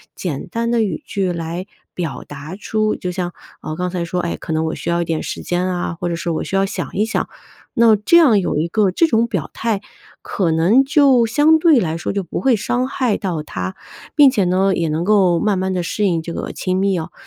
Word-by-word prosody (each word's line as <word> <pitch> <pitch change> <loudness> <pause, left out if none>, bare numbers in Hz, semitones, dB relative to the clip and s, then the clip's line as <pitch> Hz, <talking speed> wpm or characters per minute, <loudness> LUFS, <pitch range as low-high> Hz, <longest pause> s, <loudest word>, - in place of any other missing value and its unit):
简 155 -7 -4
单 230 0 -2
的 235 -1 +2
语 185 -7 -3
句 190 -2 -1
来 170 +2 -4 0.3
表 170 -5 -4
达 145 +4 -8
出 215 0 0
就 180 - -5
像， 175 -1 -3 0.3
啊， 155 - -5
刚 180 +2 -2
才 180 -1 -3
说， 175 +1 -3
哎， 170 - -2
可 - - -7
能 160 0 0
我 160 - -2
需 - - -5
要 170 0 +1
一 - - -1
点 160 -1 -2
时 - - -5
间 175 +1 -1
啊， 175 -2 -2
或 175 - -2
者 170 - -1
是 170 - -3
我 165 - -1
需 - - -8
要 195 - +3
想 195 - -4
一 210 +3 +1
想， 225 - -2 0.4
那 230 -1 +5
这 210 +11 +4
样 275 -11 +6
有 175 - -1
一 155 +3 0
个 200 +1 +1
这 330 - +3
种 230 -5 +2
表 190 -10 -3
态， 225 -3 -1 0.4
可 180 -5 -1
能 180 +11 +4
就 270 -4 +4
相 295 +7 +4
对 315 -4 +5
来 160 -6 -1
说 170 - -3
就 200 - -1
不 175 - -5
会 265 -3 +3
伤 245 +4 -1
害 250 -6 0
到 170 -6 -3
他。 95 -8 -5 0.4
并 290 -3 +7
且 220 -7 +1
呢， 190 +2 +2
也 165 -2 -1
能 160 +3 -1
够 190 -4 +3
慢 210 -3 +1
慢 190 +1 -1
地 180 - -1
适 210 +5 -2
应 170 -4 +1
这 170 +1 -6
个 - - -4
亲 185 0 -2
密 195 -1 +1
哦。 160 +2 -6
185 Hz, 260 characters per minute, -19 LUFS, 170-225 Hz, 0.4 s, 并